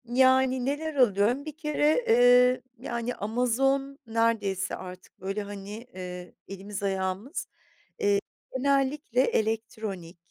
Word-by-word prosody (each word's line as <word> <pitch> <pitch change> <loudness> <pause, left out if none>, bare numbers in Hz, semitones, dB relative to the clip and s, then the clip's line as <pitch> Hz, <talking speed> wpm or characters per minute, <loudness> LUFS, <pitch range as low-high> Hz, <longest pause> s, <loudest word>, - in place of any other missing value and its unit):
Yani, 260 +1 +3
neler 295 +3 -2
alıyorum? 240 +2 +3
Bir 310 -1 -7
kere, 305 +7 +1
eee, 245 +1 +6 0.2
yani, 235 0 -3
Amazon 265 +5 0
neredeyse 225 -4 0
artık 185 0 -11
böyle, 195 +3 -3
hani, 200 -1 -8 0.2
eee, 180 -1 -7
elimiz 195 +1 -7
ayağımız, 195 - -2 0.5
eee, 200 0 +3 0.4
genellikle 275 -1 +1
elektronik 215 -7 -2
230 Hz, 105 wpm, -27 LUFS, 200-265 Hz, 0.5 s, eee